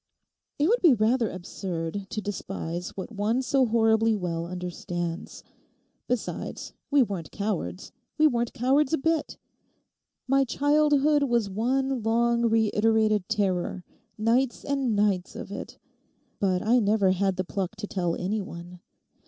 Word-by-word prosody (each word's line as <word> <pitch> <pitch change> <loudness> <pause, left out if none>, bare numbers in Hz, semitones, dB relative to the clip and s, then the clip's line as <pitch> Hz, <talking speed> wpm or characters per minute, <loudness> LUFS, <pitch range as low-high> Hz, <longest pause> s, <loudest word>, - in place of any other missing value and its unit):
'It 290 - +2
would 475 +5 +2
be 320 -8 +6
rather 225 +1 +2
absurd 185 0 -5
to 215 +1 -4
despise 180 -3 -4
what 190 - -6
one 215 +3 0
so 265 0 +2
horribly 225 0 +3
well 170 -4 -3
understands. 175 -1 -5 0.6
Besides, 250 -2 -4 0.2
we 285 -2 +5
weren't 185 - -5
cowards—we 200 - -3
weren't 240 -5 +2
cowards 265 +4 +2
a - - +4
bit. 320 +1 -1 0.9
My 270 +1 +4
childhood 295 +2 +3
was 235 -7 +1
one 260 +5 0
long, 235 +1 +2
reiterated 220 -2 +2
terror—nights 215 +5 -1
and 270 -5 0
nights 200 -3 +1
of - - -7
it. - - -7 0.6
But 185 -2 +1
I 235 +3 +4
never 205 -3 +3
had 190 0 +1
the 185 - -1
pluck 190 +2 -4
to 210 0 -5
tell 175 -4 -1
any 205 +4 -2
one. 175 -1 -9
215 Hz, 130 wpm, -26 LUFS, 185-250 Hz, 0.9 s, be